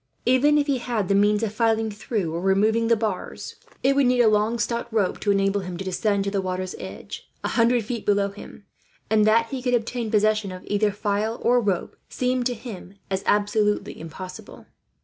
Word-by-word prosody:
Even 265 +4 +4
if 290 - +2
he 275 -3 0
had 230 -6 -2
the - - +3
means 205 +2 +3
of 215 -2 -2
filing 225 -1 +1
through 205 -5 -3
or 170 - -3
removing 215 +4 +2
the 230 - +4
bars, 215 -4 -4 0.3
it 275 +1 +3
would 275 -2 +4
need 250 0 +2
a - - +5
long 215 +2 +2
stout 235 0 -2
rope 210 -5 0
to 205 - -2
enable 195 0 +2
him 180 -2 -6
to 190 - -5
descend 200 +2 0
to 200 - -2
the 200 -1 0
water's 185 0 -3
edge, - - -9
a - - -1
hundred 235 -1 +2
feet 235 0 -4
below 200 -1 +2
him; 200 0 -12 0.5
and 215 -1 +4
that 230 +1 +4
he 265 -2 -3
could 250 -1 +1
obtain 235 0 -2
possession 215 -1 +2
of 185 0 -9
either 205 0 +1
file, 205 +3 -1
or 245 +1 +4
rope, 195 -5 -2
seemed 250 -1 0
to 245 - -3
him 215 -5 -9 0.2
as 190 0 0
absolutely 210 0 +1
impossible. 180 +3 -9
215 Hz, 205 wpm, -24 LUFS, 200-235 Hz, 0.5 s, a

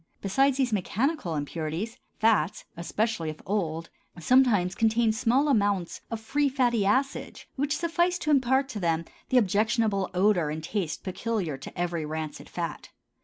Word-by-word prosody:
Besides 270 +7 +2
these 255 -4 +1
mechanical 210 - -1
impurities, 160 - -4 0.2
fats, 210 -7 +2
especially 170 0 -1
if 155 - -7
old, 165 -5 -2 0.3
sometimes 210 -3 +4
contain 225 +1 +2
small 250 +5 +2
amounts 205 -9 +1
of 230 - -3
free 285 +6 +1
fatty 240 -6 +2
acids 265 +6 -1
which 285 +2 0
suffice 345 +1 +1
to 305 -3 -1
impart 265 0 +3
to 215 - -5
them 165 -2 0 0.2
the 260 - +3
objectionable 215 -1 +2
odor 180 -4 +3
and 155 +1 -4
taste 175 -2 -3
peculiar 190 -4 -2
to 135 - -10
every 175 -2 -1
rancid 155 0 -5
fat. - - -5
215 Hz, 145 wpm, -27 LUFS, 170-255 Hz, 0.3 s, sometimes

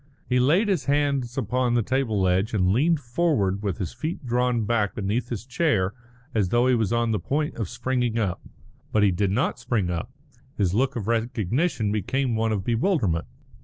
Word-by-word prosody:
He 125 0 +2
laid 165 - +3
his 190 -8 0
hands 140 -4 0
upon 125 0 0
the 120 - +2
table 110 -6 0
edge, 95 +5 +1
and 90 -2 +2
leaned 155 +7 +3
forward 120 - 0
with 100 -3 -2
his 95 -5 -4
feet 155 +5 -5
drawn 120 -2 +1
back 105 -3 0
beneath 110 +4 -2
his 120 -1 -4
chair 120 - +1 0.4
as 105 -5 +1
though 120 +3 +3
he 130 - +4
was 110 -5 +1
on 115 -1 +1
the 105 - 0
point 150 +2 -1
of 110 -7 -3
springing 125 -3 -1
up. 100 -6 -1 0.5
But 105 - +3
he 100 - +4
did 95 +2 0
not 120 +5 0
spring 110 -7 -1
up. 85 -1 -3 0.5
His 95 -3 +1
look 130 +5 +1
of 110 -4 -4
recognition 115 - 0
became 125 +4 0
one 110 0 +1
of 100 -3 -1
bewilderment. 115 - +1
120 Hz, 190 wpm, -25 LUFS, 105-130 Hz, 0.5 s, he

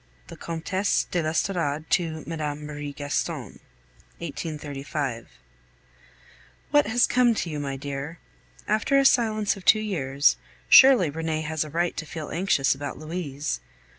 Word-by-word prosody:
LI. - - -34
THE - - -10
COMTESSE 185 +4 -1
DE 175 - +1
L'ESTORADE 155 -1 -1
TO 160 -3 0
MME. 155 -3 -3
MARIE 145 -1 -6
GASTON 145 0 -3 0.6
1835. 145 -5 -5 1.4
What 290 -3 +4
has 245 +3 +4
come 245 -2 +3
to 170 - -3
you, 150 - -4
my 140 -1 -3
dear? 140 +3 -5 0.5
After 220 +6 +2
a 275 - +4
silence 220 -5 +3
of 195 - -11
two 215 - +6
years, 145 -9 +1 0.3
surely 255 - +7
Renee 160 0 -2
has 155 0 -2
a 155 - -9
right 170 +3 -1
to 155 - -4
feel 155 -1 -6
anxious 170 -6 +2
about 140 +1 -6
Louise. 155 -3 -4
160 Hz, 140 wpm, -25 LUFS, 145-190 Hz, 1.4 s, surely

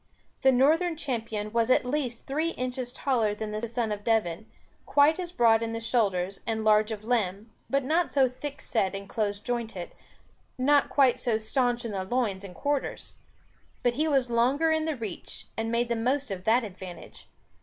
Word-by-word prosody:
The 265 - +6
Northern 315 +6 +3
Champion 225 -7 -3
was 230 0 +2
at 255 - +4
least 250 -3 -2
three 315 +5 -1
inches 250 0 -3
taller 235 -6 0
than 215 0 -5
the 215 +2 -3
Son 230 -1 -1
of 205 0 -4
Devon, 215 -3 0 0.4
quite 295 +4 +4
as 350 -1 -4
broad 230 -8 +4
in 225 0 -2
the 230 - -2
shoulders 195 -5 0
and 220 -1 -1
large 215 0 +4
of 215 -1 -5
limb, 215 -2 -1 0.2
but 275 0 +1
not 320 +6 +1
so 270 -2 +4
thick 275 +3 -7
set 195 -4 0
and 195 0 -7
close 205 -1 -1
jointed, 225 -5 -4 0.7
not 280 +2 +3
quite 270 -4 +4
so 235 -4 +1
stanch 240 +2 0
in 230 - -3
the 195 -2 -2
loins 205 -2 -1
and 185 -2 -9
quarters. 285 -1 -3 0.7
But 245 - +3
he 305 +5 0
was 270 -5 +1
longer 265 +8 +3
in 315 0 +1
the 315 -2 -1
reach, 220 -7 -6
and 225 0 -2
made 235 +1 +1
the 235 - 0
most 255 +3 0
of 185 -1 -5
that 235 +3 +4
advantage. 185 -3 -10
235 Hz, 185 wpm, -28 LUFS, 215-270 Hz, 0.7 s, The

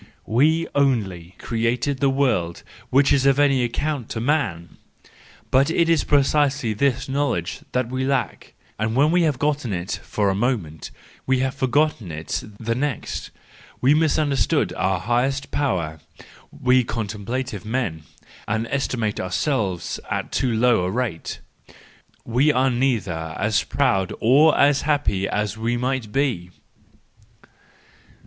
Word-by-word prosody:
We 155 +8 +2
only 110 -12 +1
have 90 +2 -21
created 120 +4 -1
the 140 0 +3
world 125 -12 0 0.3
which 135 +2 +4
is 135 -1 +3
of 135 0 +4
any 140 -3 +3
account 125 +1 -2
to 115 - -4
man 110 - -1 0.3
l - - -22 0.4
—But 135 +3 +4
it 165 0 +2
is 165 -2 +3
precisely 140 -4 +2
this 130 +3 0
knowledge 135 -11 -1
that 125 -1 0
we 130 0 -1
lack, 135 -3 -2 0.2
and 110 +1 -1
when 145 +4 +4
we 180 - +3
get 155 -7 +1
hold 150 0 0
of 120 - -4
it 90 +1 -3
for 100 -2 0
a - - 0
moment 100 -8 -2 0.4
we 130 0 +3
have 135 0 0
forgotten 135 - 0
it 75 +1 -4 0.2
the 115 0 -1
next: 135 0 -3 0.5
we 135 +3 +4
misunderstand 150 -3 +1
our 95 -1 0
highest 125 +7 -1
power, 85 - -1 0.5
we 125 0 +2
contemplative 110 +1 -4
men, 110 -8 -2 0.5
and 110 +2 -1
estimate 120 -6 -1
ourselves 95 - -1
at - - -3
too 130 - 0
low 115 -3 +3
a 90 - -1
rate, 110 -6 -3 0.4
— - - -30
we 145 +5 +5
are 130 -1 +2
neither 100 -11 -1
as 105 +1 +1
proud 95 -10 0
nor 145 +7 +5
as 140 0 +4
happy 105 -10 0
as 105 +1 -2
we 120 +2 0
might 125 -3 -2
be, 120 -10 -1 0.9
302. - - -23
125 Hz, 145 wpm, -22 LUFS, 105-140 Hz, 0.9 s, we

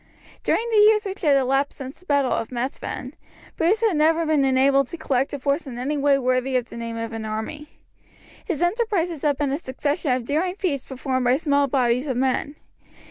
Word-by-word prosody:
During 465 - +1
the 435 - +4
years 425 0 +5
which 390 0 -5
had 295 -6 +4
elapsed 270 +1 +1
since 265 0 -8
the 365 - -21
battle 280 -3 +2
of 225 - -1
Methven, 255 +1 -4 0.4
Bruce 375 +7 +2
had 440 -6 +2
never 325 +2 +3
been 310 -3 +2
enabled 270 0 +3
to 340 - -7
collect 270 -4 0
a 285 - -3
force 280 +3 -1
in 245 -3 -7
any 270 +5 -2
way 285 -1 +3
worthy 255 0 0
of 245 -1 -3
the - - -10
name 230 0 -5
of 230 0 -4
an 225 -1 -5
army. 220 +8 -5 0.8
His 350 -5 -2
enterprises 355 - 0
had 290 -2 +1
been 285 -1 0
a 280 - -1
succession 285 +1 -2
of 250 -1 0
daring 340 +7 0
feats 305 -10 -2
performed 260 -1 -2
by 250 +2 +4
small 285 -2 +2
bodies 250 0 +1
of 260 -3 -1
men. 265 +3 0
280 Hz, 205 wpm, -23 LUFS, 255-320 Hz, 0.8 s, years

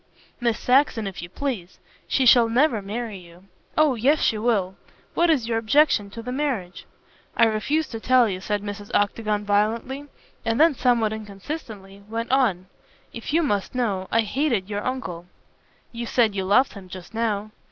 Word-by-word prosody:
"Miss 235 -3 +1
Saxon, 250 -4 +2
if 195 -1 -6
you 170 - -8
please. 200 -5 -4 0.3
She 265 - +1
shall 235 -2 +6
never 240 -2 +2
marry 210 0 -5
you." 175 0 -16 0.3
"Oh, 305 -3 +4
yes, 270 +6 +2
she 215 - +1
will. 210 -5 +1 0.4
What 340 0 +2
is 270 -8 +2
your 225 -1 0
objection 225 -2 +3
to 230 +3 -8
the 250 - -5
marriage?" 255 -10 -3 0.5
"I - - +6
refuse 255 +9 0
to 225 - -6
tell 250 0 +4
you," 185 -2 -4
said 205 +1 -2
Mrs. 205 0 -7
Octagon 210 0 0
violently, 225 +7 0 0.4
and 225 +1 0
then 325 0 +6
somewhat 240 -4 +2
inconsistently 205 -1 -8
went 230 +2 -3
on: 225 -10 +2 0.5
"If 230 - -6
you 330 +2 +3
must 205 -5 -1
know, 200 -7 -1
I 230 - +4
hated 230 -3 0
your 205 0 -2
uncle." 190 -10 -4 0.6
"You 235 0 -5
said 225 -4 +2
you 190 -1 -2
loved 250 +8 +3
him 195 -3 -11
just 185 +2 -10
now." 215 -2 -1
225 Hz, 175 wpm, -24 LUFS, 200-255 Hz, 0.6 s, shall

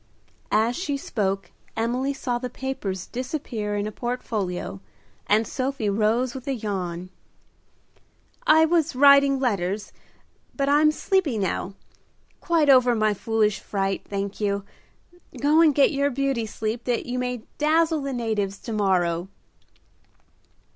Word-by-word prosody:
As 225 +3 +2
she 295 -6 -2
spoke 195 -7 -2 0.3
Emily 245 +4 0
saw 250 -3 -2
the 250 0 -4
papers 215 -8 -4
disappear 245 -5 -4
in 205 0 -1
a 215 - -4
portfolio, 210 -6 -4 0.5
and 215 +2 +3
Sophie 255 -5 -2
rose 225 +4 +1
with 265 -1 -9
a 275 - 0
yawn. 185 -5 -4 1.4
"I 315 +1 +7
was 325 -3 +1
writing 280 0 +6
letters, 205 -5 -1 0.6
but 275 -1 0
I'm 295 +2 +5
sleepy 315 - 0
now. 195 -1 -2 0.6
Quite 330 -4 +2
over 255 -3 +6
my 215 -1 +2
foolish 215 0 0
fright, 195 -1 -2
thank 200 +1 -4
you. 200 -1 0 0.8
Go 300 +3 +4
and 310 -4 +5
get 280 - +5
your 280 -1 +1
beauty 270 -4 -1
sleep 220 +3 -4
that 245 -2 -1
you 250 0 -3
may 250 -2 -3 0.2
dazzle 315 +1 +2
the 275 0 -3
natives 215 -5 -2
to 230 - -5
morrow." 180 -4 +1
240 Hz, 135 wpm, -24 LUFS, 205-275 Hz, 1.4 s, I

